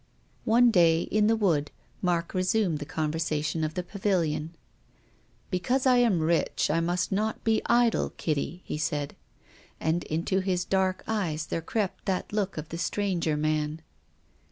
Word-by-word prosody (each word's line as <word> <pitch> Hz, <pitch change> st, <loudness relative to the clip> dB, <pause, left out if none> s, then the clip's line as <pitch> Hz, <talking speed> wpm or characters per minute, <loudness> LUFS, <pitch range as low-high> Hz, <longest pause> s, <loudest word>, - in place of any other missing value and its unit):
One 235 Hz, +2 st, +5 dB
day, 170 Hz, -4 st, +4 dB
in 210 Hz, 0 st, +2 dB
the 225 Hz, -, +4 dB
wood, 165 Hz, -9 st, +1 dB, 0.3 s
Mark 175 Hz, -2 st, 0 dB
resumed 185 Hz, -3 st, +1 dB
the 145 Hz, -, -5 dB
conversation 155 Hz, 0 st, -1 dB
of 155 Hz, 0 st, -2 dB
the 180 Hz, -, -2 dB
Pavilion. 175 Hz, -5 st, -1 dB, 0.5 s
" -, -, -36 dB
Because 245 Hz, +9 st, 0 dB
I 255 Hz, -1 st, +5 dB
am 225 Hz, -9 st, +3 dB
rich 165 Hz, -1 st, +1 dB
I 165 Hz, -, +2 dB
must 175 Hz, +1 st, -1 dB
not 215 Hz, +3 st, -1 dB
be 225 Hz, -1 st, +2 dB
idle, 235 Hz, -1 st, +3 dB
Kitty," 155 Hz, +3 st, -2 dB
he 150 Hz, -, -4 dB
said. 145 Hz, -2 st, -2 dB, 0.6 s
And 160 Hz, +2 st, 0 dB
into 170 Hz, +5 st, 0 dB
his 185 Hz, -2 st, -1 dB
dark 190 Hz, -1 st, 0 dB
eyes 170 Hz, -8 st, -1 dB
there 165 Hz, -, -3 dB
crept 200 Hz, +3 st, -3 dB
that 190 Hz, +1 st, -2 dB
look 200 Hz, -4 st, -1 dB
of 155 Hz, 0 st, -5 dB
the 165 Hz, -, -5 dB
stranger 175 Hz, -6 st, 0 dB
man. 155 Hz, +1 st, -1 dB
175 Hz, 155 wpm, -27 LUFS, 155-205 Hz, 0.6 s, One